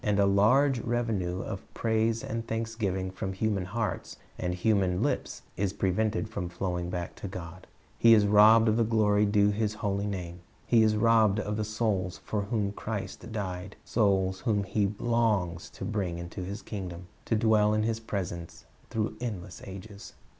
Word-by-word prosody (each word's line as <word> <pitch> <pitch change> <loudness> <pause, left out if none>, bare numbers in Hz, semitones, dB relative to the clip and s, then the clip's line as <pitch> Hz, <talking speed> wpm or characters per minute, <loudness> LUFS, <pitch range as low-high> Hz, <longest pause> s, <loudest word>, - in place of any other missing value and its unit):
And 105 -1 +1
a 100 - +5
large 120 +7 +4
revenue 110 -7 -1
of 95 - -5
praise 115 0 +1
and 115 0 -4
thanksgiving 110 -5 -2
from 95 0 -4
human 100 -1 -1
hearts 105 +2 -3 0.2
and 90 0 -1
human 95 -2 +1
lips - - -2
is 100 0 0
prevented 105 +3 0
from 100 -5 -4
flowing 90 -1 -3
back 90 -1 -4
to - - -6
God. 90 -1 -8 0.3
He 115 -1 +8
is 105 -2 +4
robbed 110 +2 +7
of 110 0 +3
the 115 - +4
glory 105 -2 +3
due 100 0 +4
to - - -3
His 105 0 -1
holy 100 -1 -1
name. 90 -3 -5 0.3
He 115 -2 +4
is 110 -1 +4
robbed 110 -2 +4
of 105 0 -2
the 110 - -1
souls 105 -4 -1
for 105 - -1
whom 100 -1 -1
Christ 105 +1 -5
died, 95 -2 -4
souls 95 -4 +1
whom 105 -3 +1
He 100 0 0
longs 105 -8 0
to - - -7
bring 95 -5 -2
into 85 +2 -6
His 100 +3 -6
kingdom, 90 -4 -6 0.2
to 115 - +1
dwell 105 -1 +4
in 110 - +1
His 115 0 0
presence 90 -6 -5 0.2
through 110 -1 -2
endless 100 -6 -5
ages. 100 +2 -9
105 Hz, 175 wpm, -29 LUFS, 95-110 Hz, 0.3 s, He